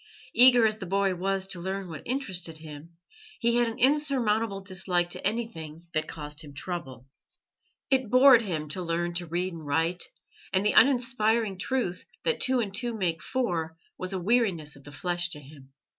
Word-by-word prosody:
Eager 245 -2 +7
as 215 0 0
the 190 - -6
boy 195 +1 +1
was 190 +1 -1
to 185 -2 -3
learn 190 +2 -4
what 160 -4 -7
interested 185 - -1
him, 155 +1 -11 0.4
he 235 0 +2
had 240 -1 +3
an 230 +1 -5
insurmountable 245 -7 +2
dislike 185 -2 -1
to - - -7
anything 170 -8 -4
that 155 -1 -1
caused 150 -1 -5
him 145 -2 -12
trouble. 135 -8 -6 0.9
It 260 -4 +2
bored 255 0 +7
him 165 -8 -3
to 180 +5 -4
learn 175 0 -1
to 175 0 -3
read 175 +3 -2
and 165 -2 -8
write, 165 +4 0 0.5
and 190 +2 +1
the 210 - +3
uninspiring 235 -6 +3
truth 190 -7 -2 0.2
that 480 - +1
two 255 -1 +2
and 205 -5 -2
two 235 +1 -3
make 170 -5 -1
four 170 -11 -2 0.2
was 185 +1 -4
a 190 - -2
weariness 180 -8 +1
of 140 - -17
the 145 - -10
flesh 175 +3 -1
to 150 - -3
him. 140 -1 -15
185 Hz, 180 wpm, -27 LUFS, 165-230 Hz, 0.9 s, Eager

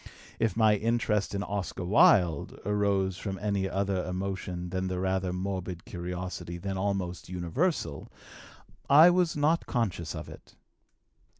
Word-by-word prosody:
If 115 -1 0
my 110 -2 +5
interest 105 -2 0
in 100 - -1
Oscar 95 -3 -4
Wilde 90 - +4
arose 100 -2 +1
from 95 -2 -4
any 100 -2 -1
other 95 -1 -1
emotion 90 -1 -4
than 95 0 -1
the 95 0 -2
rather 95 0 0
morbid 90 -2 -4
curiosity 90 0 -5
then 95 +2 -4
almost 95 -5 -2
universal, 90 - -2 0.8
I 155 +5 +8
was 175 -2 +2
not 155 +3 +2
conscious 100 - -2
of - - -6
it. - - -13
95 Hz, 130 wpm, -29 LUFS, 90-105 Hz, 0.8 s, I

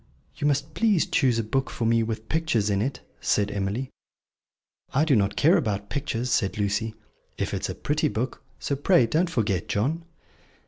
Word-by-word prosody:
"You 145 - 0
must 145 +2 0
please 215 -7 +3
choose 125 -3 +2
a 115 - +1
book 135 +5 -1
for 115 - -3
me 115 0 +3
with 110 0 -3
pictures 120 -11 +1
in 100 0 +1
it," 135 +5 -2 0.2
said 105 0 +1
Emily. 105 +6 -2 1.0
"I 150 +4 +4
do 145 -4 +4
not 100 -1 +1
care 95 - +5
about 100 -1 -2
pictures," 125 -4 -2
said 105 -2 +1
Lucy, 105 +2 -1 0.4
"if - - -2
it - - -2
is - - -3
a - - -4
pretty 150 +1 0
book. 125 -1 -3 0.2
So 140 - -2
pray 145 -1 +4
don't 160 +10 +1
forget, 105 - 0
John." 145 +11 0
115 Hz, 185 wpm, -26 LUFS, 105-145 Hz, 1.0 s, care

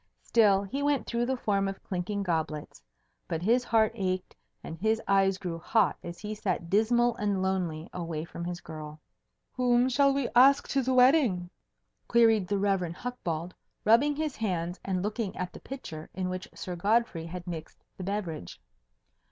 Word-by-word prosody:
Still 205 -4 +4
he 235 +9 -4
went 285 -1 +1
through 235 +1 -1
the 260 0 0
form 200 -4 0
of 195 0 -6
clinking 195 +2 -3
goblets. 160 - -3 0.5
But 165 0 -3
his 240 +5 +3
heart 225 -3 +3
ached, 185 -4 -2 0.3
and 160 - -6
his 220 +3 +2
eyes 195 -1 +3
grew 175 -4 -5
hot 220 +6 +2
as 170 0 -7
he 210 0 -5
sat 185 -5 -3
dismal 235 +3 +3
and 205 -2 0
lonely 175 -4 -1
away 165 -3 -4
from 170 - -7
his 175 0 -4
girl. 155 -1 -8 0.5
"Whom 245 -1 +3
shall 275 +2 +4
we 275 -2 0
ask 275 +3 +6
to 275 - +2
the 260 0 0
wedding?" 250 - +4 0.6
queried 225 -5 +4
the 205 - 0
Rev. 195 -1 +1
Hucbald, 175 -7 -4 0.3
rubbing 275 +7 +5
his 305 -2 -2
hands 180 -4 -2
and 185 -2 -1
looking 210 -1 -3
at 180 0 -4
the - - -9
pitcher 160 - -8
in 185 -1 -2
which 185 0 -5
Sir 180 - -5
Godfrey 200 -3 +1
had 175 +1 -7
mixed 165 -3 -7
the 185 - -6
beverage. 180 - -4
195 Hz, 170 wpm, -29 LUFS, 175-235 Hz, 0.6 s, ask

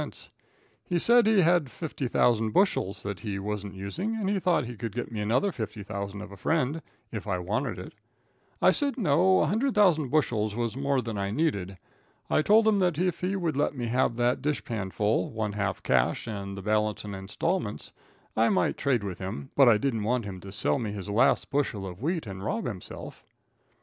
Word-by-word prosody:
He 175 - -1
said 235 +5 +5
he 215 -3 +5
had 170 -4 +3
50,000 120 -7 0
bushels 105 - +1
that 100 -2 -4
he 100 -1 -4
wasn't 100 0 -4
using, 165 - -3
and 215 -3 -2
he 200 -1 +1
thought 175 -7 +2
he 120 +1 -7
could 115 -1 -5
get 120 - -4
me 110 - -4
another 120 - +1
50,000 100 - -5
of 105 -1 -9
a 100 - -10
friend, 155 - 0 0.3
if 110 -2 -5
I 95 -2 0
wanted 105 +10 -2
it. - - -8 0.7
I - - +7
said 285 -2 0
no, 165 - +2 0.2
100,000 200 - +3
bushels 110 -8 +1
was 120 -1 -2
more 140 -1 0
than 115 -3 -4
I 100 0 -1
needed. 100 - -1 0.5
I - - +4
told 215 +7 +5
him 210 -2 +4
that 180 -5 +2
if 180 0 0
he 185 +2 -1
would 170 -6 -1
let 145 +1 0
me 120 - -2
have 125 -1 +1
that 120 +1 +1
dishpan 120 -9 -2
full, 105 +2 +1
one 110 -2 -3
half 100 -2 -2
cash 60 -2 +2
and 100 -3 -5
the 100 - -7
balance 105 0 0
in 105 - -6
installments, 105 - -3 0.4
I 115 +1 +4
might 190 - +1
trade 130 -7 +1
with 95 -3 -5
him, 80 -7 -6
but 135 -3 +7
I 110 - +6
didn't 115 -1 -1
want 115 +2 0
him 95 -2 -6
to 95 +2 -10
sell 110 +6 0
me 110 -4 -3
his 100 -1 -6
last 105 +7 +2
bushel 130 -8 -1
of 90 +1 -8
wheat 165 +2 -1
and 95 -2 -7
rob 115 +2 -2
himself. 105 -7 -7
115 Hz, 195 wpm, -28 LUFS, 100-160 Hz, 0.7 s, I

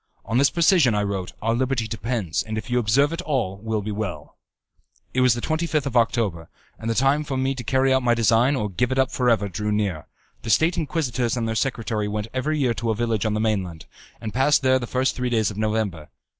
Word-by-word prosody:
"On 115 +3 +1
this 140 - +5
precision," 165 - +4
I 105 - +1
wrote, 95 -2 -3
"our 115 +1 +1
liberty 125 -1 0
depends 110 -5 -2
and 110 0 -5
if 110 +3 -6
you 125 - +3
observe 135 +7 +2
it 165 - -3
all 125 - -1
will 110 0 -3
be 105 - -4
well." 105 -3 -5 0.8
It 130 - +2
was 125 -2 +4
the 120 - -4
25th 155 -1 -1
of 135 -3 -4
October, 110 -8 +1 0.3
and 115 - -4
the 115 - 0
time 135 +4 +2
for 140 -3 -3
me 130 +1 0
to 130 -2 -7
carry 130 +2 +2
out 130 - +3
my 120 -1 +2
design 115 +4 +3
or 105 -5 -1
to 100 - -11
give 125 +7 0
it 130 - -1
up 130 -1 +2
for 125 -1 +1
ever 105 -3 +2
drew 105 +3 -3
near. 100 -7 -1 0.3
The 115 - -6
State 160 - +3
Inquisitors 130 -7 -1
and 115 -1 -1
their 110 - -1
secretary 110 -3 -1
went 105 +1 -3
every 145 +4 -1
year 130 -5 +1
to 115 0 -3
a 110 - +1
village 115 -1 0
on 105 - -1
the - - -1
mainland, 95 -7 -2 0.3
and 110 -2 -6
passed 135 +4 +3
there 130 0 +4
the 120 - -5
first 130 +2 0
three 125 -1 -2
days 110 -3 +1
of 100 - -9
November. 105 -8 -2
115 Hz, 240 wpm, -23 LUFS, 105-130 Hz, 0.8 s, this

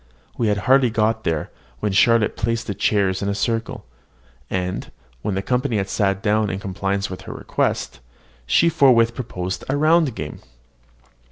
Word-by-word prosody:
We 115 - 0
had 105 -1 +2
hardly 130 -1 +5
got 110 0 0
there, 80 -2 -1 0.3
when 105 - -1
Charlotte 110 +3 +3
placed 115 +1 -1
the 105 - -3
chairs 95 -2 +1
in 100 - -1
a 100 - -1
circle; 115 - -2 0.6
and, 90 0 -3 0.3
when 100 - -2
the 95 - -2
company 125 0 0
had 100 -1 -2
sat 95 -1 0
down 105 0 +2
in 95 - -3
compliance 100 0 -2
with 95 - -7
her - - -5
request, - - -2 0.5
she 170 - +4
forthwith 120 -7 +4
proposed 95 -7 -5
a 140 - +1
round 155 -4 +3
game. 75 - -6
105 Hz, 165 wpm, -21 LUFS, 95-115 Hz, 0.6 s, hardly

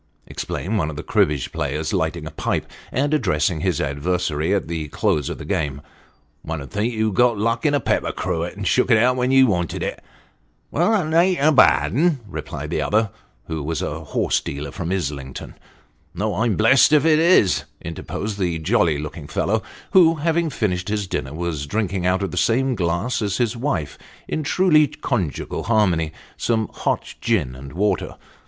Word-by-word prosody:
" - - -40
exclaimed 105 +4 -3
one 80 - 0
of 75 - -6
the 75 - -6
cribbage 75 -3 +1
players, 75 0 -2
lighting - - -1
a - - -6
pipe, - - -2 0.3
and 145 +4 0
addressing 85 - +1
his 90 -4 0
adversary 80 +2 -1
at 100 -4 0
the 80 -2 -3
close 75 0 0
of - - -5
the - - -8
game; 70 -3 -2 0.6
"one 80 0 -4
'ud 70 - -9
think 105 +4 0
you'd 110 -2 0
got 120 +2 +3
luck 115 +6 0
in 145 - +2
a - - +2
pepper - - 0
cruet, 85 +2 -3
and 100 0 -5
shook 125 +6 +2
it 115 - +6
out 125 +3 +3
when 125 0 0
you 135 0 +6
wanted 90 -7 -1
it." - - -4 0.3
" - - -42
Well, 175 +6 +2
that 185 -8 +1
a'n't 175 +2 +4
a - - +5
bad 75 - +5
'un," 155 +2 +2
replied 95 - -6
the - - 0
other, 110 -1 +1 0.3
who 80 -1 -4
was 80 +1 -2
a - - -4
horse - - +1
dealer 70 0 -6
from 85 +1 -4
Islington. 70 -8 -4 0.3
" 75 0 -39
No; 105 +3 -1
I'm 110 +2 +1
blessed 120 +6 +5
if 150 0 +5
it 155 -1 +5
is," 105 - +4
interposed 100 +5 -5
the 90 -3 0
jolly 85 -2 +2
looking 75 0 -7
fellow, 110 +6 0 0.3
who, 170 -4 +6
having 165 +2 0
finished 90 -8 -2
his 105 -1 -1
dinner, 70 -5 -4
was 80 -4 -3
drinking 95 -1 -1
out 95 +2 +1
of 95 - -2
the 90 - -6
same 125 +8 +2
glass 90 +5 -1
as 100 -2 -1
his 120 -1 0
wife, 115 - -2 0.3
in 155 - -2
truly 155 -1 +4
conjugal 120 - -3
harmony, 90 -8 +2 0.3
some 110 -2 0
hot - - -2
gin 90 - 0
and 70 +2 -10
water. 100 +5 0
100 Hz, 190 wpm, -22 LUFS, 80-125 Hz, 0.6 s, it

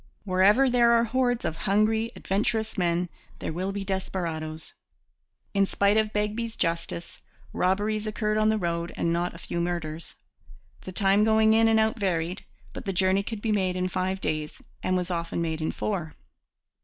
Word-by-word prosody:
Wherever 205 +7 +4
there 240 -1 +4
are 230 0 +5
hordes 245 +1 0
of 160 - -1
hungry, 220 +3 +1
adventurous 220 +3 -1
men, 175 -2 +1 0.3
there - - -4
will 185 +4 -2
be 200 0 -4
desperadoes. 165 -5 -4 0.8
In 200 -1 +3
spite 200 +1 +2
of 215 -1 +2
Begbie's 215 +2 -2
justice, 170 0 -3 0.3
robberies 210 +3 0
occurred 215 0 0
on 215 0 +3
the 220 - +2
road 170 -3 -2
and 170 - +1
not 175 0 -1
a - - -8
few 170 0 -4
murders. 170 -2 -4 0.7
The 185 - -5
time 195 +2 +3
going 220 0 +4
in 225 0 +5
and 220 0 +4
out 220 +1 +1
varied; 180 -2 -1 0.3
but - - -8
the 195 - -1
journey 190 +1 +3
could 205 +1 -6
be 225 - +1
made 190 -3 +1
in 185 0 -1
five 185 +1 -1
days 155 -4 -3 0.2
and 185 0 +1
was 180 0 -2
often 170 -1 -2
made 160 -1 -2
in 155 - 0
four. 175 -7 -3
195 Hz, 175 wpm, -27 LUFS, 175-220 Hz, 0.8 s, are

